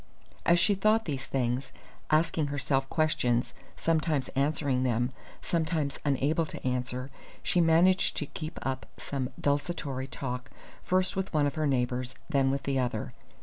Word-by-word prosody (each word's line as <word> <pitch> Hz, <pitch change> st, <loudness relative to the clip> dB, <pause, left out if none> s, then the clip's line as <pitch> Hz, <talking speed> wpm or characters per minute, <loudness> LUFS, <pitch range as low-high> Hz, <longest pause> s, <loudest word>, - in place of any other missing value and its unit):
As 170 Hz, -, +6 dB
she 205 Hz, -, +4 dB
thought 215 Hz, +3 st, +3 dB
these 140 Hz, -4 st, -3 dB
things, 125 Hz, 0 st, -1 dB, 0.4 s
asking 155 Hz, -1 st, +2 dB
herself 135 Hz, -1 st, 0 dB
questions, 120 Hz, -7 st, +1 dB, 0.2 s
sometimes 155 Hz, -4 st, +1 dB
answering 140 Hz, -2 st, +1 dB
them, 120 Hz, 0 st, +1 dB, 0.3 s
sometimes 160 Hz, -4 st, -1 dB
unable 150 Hz, +3 st, +1 dB
to -, -, -6 dB
answer, 125 Hz, +1 st, -2 dB, 0.3 s
she 175 Hz, -, +2 dB
managed 170 Hz, +3 st, +4 dB
to -, -, -1 dB
keep 155 Hz, 0 st, -7 dB
up 130 Hz, 0 st, -3 dB
some 130 Hz, -3 st, -3 dB
desultory 145 Hz, -2 st, -1 dB
talk 125 Hz, -1 st, -4 dB, 0.3 s
first 185 Hz, 0 st, +2 dB
with 190 Hz, 0 st, -2 dB
one 150 Hz, -1 st, +4 dB
of 145 Hz, -, 0 dB
her 155 Hz, -1 st, 0 dB
neighbours, 125 Hz, -1 st, 0 dB, 0.2 s
then 135 Hz, -3 st, +3 dB
with 135 Hz, +1 st, -1 dB
the 135 Hz, -1 st, 0 dB
other. 120 Hz, -4 st, -2 dB
140 Hz, 145 wpm, -29 LUFS, 130-160 Hz, 0.4 s, As